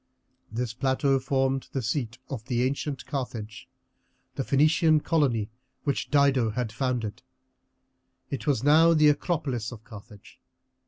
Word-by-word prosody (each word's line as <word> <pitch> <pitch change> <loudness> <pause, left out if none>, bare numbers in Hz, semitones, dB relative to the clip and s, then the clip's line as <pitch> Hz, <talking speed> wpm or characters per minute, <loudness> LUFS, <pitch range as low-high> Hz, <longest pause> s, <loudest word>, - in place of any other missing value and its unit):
This 115 0 -3
plateau 135 +2 +1
formed 135 0 0
the 135 - -1
seat 120 -1 -2
of 120 -6 -6
the 125 -2 0
ancient 140 +1 -2
Carthage, 120 -7 -6 0.6
the 135 - -3
Phoenician 155 +3 +3
colony 120 -11 +1 0.3
which 140 - -1
Dido 140 -5 +3
had 110 0 -3
founded. 120 -3 -2 1.1
It 140 +2 -4
was 140 -3 +1
now 160 +3 +6
the 155 -1 +6
acropolis 145 -7 -1
of 115 -3 -10
Carthage. 105 -2 -14
130 Hz, 125 wpm, -27 LUFS, 115-145 Hz, 1.1 s, now